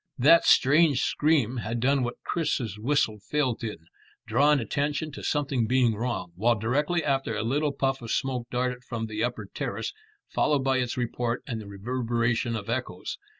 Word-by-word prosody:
That 155 +6 +6
strange 145 0 +5
scream 140 -6 +2
had 115 0 -3
done 135 +3 +2
what 120 -1 -4
Chris's 125 - -2
whistle 115 -3 +1
failed 125 +2 -1
in, 105 -7 -5 0.4
drawn 140 +6 +4
attention 145 +6 -2
to 145 - -8
something 140 -6 0
being 125 -2 +3
wrong, 115 -4 -3
while 115 +5 +2
directly 145 - 0
after 135 -6 0
a 105 - -1
little 145 +6 +1
puff 135 -1 -1
of 115 - -7
smoke 125 -2 -1
darted 125 0 -2
from 115 -2 -4
the 110 0 -3
upper 120 -4 -2
terrace, - - -4 0.3
followed 145 -3 +1
by 135 -1 +2
its 125 -1 -2
report 120 0 -2
and 115 -5 -4
the 105 - -10
reverberation 115 +2 -1
of 105 -3 -5
echoes. 115 -6 -4
125 Hz, 170 wpm, -27 LUFS, 115-140 Hz, 0.4 s, That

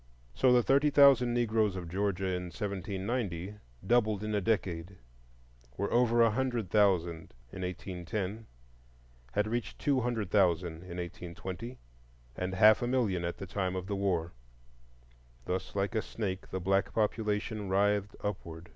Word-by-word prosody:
So 130 - +4
the 125 -1 +5
thirty 140 +4 +4
thousand 140 -4 +6
Negroes 110 -4 +1
of 90 -2 -5
Georgia 95 +1 -1
in 90 -1 -1
1790 100 0 -3 0.3
doubled 110 -2 +2
in 110 0 -2
a 105 - +1
decade,—were - - -5
over 120 -1 +4
a 115 - +4
hundred 120 -5 -1
thousand 85 - +2 0.2
in 95 - -7
1810, 95 +3 -4 0.9
had 105 - +2
reached 120 +2 -3
two 140 -3 +1
hundred 115 -6 -2
thousand 90 -4 +2
in 90 -1 -7
1820, 90 +6 -6 0.6
and 90 +1 -3
half 110 +1 +6
a 120 - 0
million 115 -9 +1
at 85 0 -3
the - - -6
time 95 0 -2
of 90 -1 -3
the 100 +1 -2
war. 90 -4 -1 1.1
Thus 95 +2 -3
like 100 +2 0
a 110 - +1
snake 95 -5 -4
the 95 - -3
black 95 +2 0
population 105 -1 -1
writhed 100 +1 +1
upward. 85 -5 -5
100 Hz, 145 wpm, -31 LUFS, 90-110 Hz, 1.1 s, thousand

